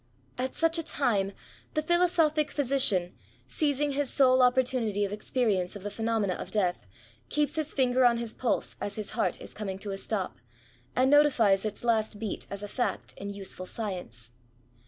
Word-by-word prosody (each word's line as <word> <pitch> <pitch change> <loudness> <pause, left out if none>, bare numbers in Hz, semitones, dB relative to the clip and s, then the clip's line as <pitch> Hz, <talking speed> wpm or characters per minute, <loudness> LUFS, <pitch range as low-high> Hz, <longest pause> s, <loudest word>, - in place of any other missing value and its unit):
'^ 250 - -1
At 260 - -3
such 330 0 +3
a - - -2
time, 230 -11 +1 0.4
the 310 - +2
philosophic 330 -3 +2
physician, 250 -12 +2 0.3
seizing 290 -1 +1
his 280 -1 0
sole 260 -2 +4
oppor 250 +1 +5
tunity 220 -5 0
of 200 - -5
experience 210 -4 0
of 200 - -8
the 205 - -4
phenomena 220 -3 0
of - - -7
death, 180 - -1 0.4
keeps 295 0 0
his 315 -1 -2
finger 255 -1 +3
on 240 -1 +5
his 235 -1 -3
pulse 245 - -1
as 205 0 -3
his 215 -2 -5
heart 220 +1 -1
is - - -8
coming 195 -3 -4
to 200 +1 -5
a 195 - -3
stop, 195 -2 -3 0.6
and 260 +2 +3
notifies 235 -10 +4
its 215 +1 -4
last 220 -2 +1
beat 210 -2 -5
as 200 +1 -5
a - - -4
fact 245 +4 -2
in 200 - -6
useful 195 -2 -5
science. 175 - -5
230 Hz, 180 wpm, -28 LUFS, 200-275 Hz, 0.6 s, oppor